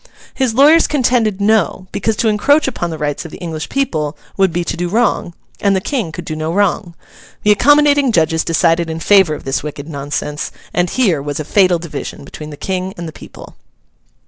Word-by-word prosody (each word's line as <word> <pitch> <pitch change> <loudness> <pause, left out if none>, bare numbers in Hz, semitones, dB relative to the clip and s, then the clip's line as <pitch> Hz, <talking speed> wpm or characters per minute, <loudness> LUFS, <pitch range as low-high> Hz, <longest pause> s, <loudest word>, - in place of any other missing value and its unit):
His 255 -5 -1
lawyers 300 +5 +6
contended 240 -7 +1
No, 205 -2 +1
because 220 +2 -1
to 225 - 0
encroach 280 +9 +3
upon 175 -9 -3
the 160 - -5
rights 145 -1 -3
of 165 - -8
the - - -10
English 160 -3 -5
people 155 - -1 0.2
would 190 -2 +2
be 175 +1 -1
to - - -3
do 175 0 -3
wrong, 215 -5 0 0.2
and 200 -1 +2
the - - +2
King 215 - -3
could - - -7
do 155 - -4
no 155 +1 -3
wrong. 190 -2 0 0.5
The 210 - +4
accommodating 285 +3 +4
judges 160 -4 +2
decided 165 0 +1
in 160 0 -4
favour 190 -4 +4
of - - -10
this 135 0 -1
wicked 145 0 -7
nonsense; 145 0 -4 0.2
and 175 0 +1
here 190 - +1
was 145 +1 -4
a 155 - -4
fatal 185 0 +3
division 165 -3 -7
between 150 +2 -9
the 145 - -9
King 190 +2 -3
and 170 -1 -6
the - - -7
people. - - -13
175 Hz, 200 wpm, -16 LUFS, 160-220 Hz, 0.5 s, lawyers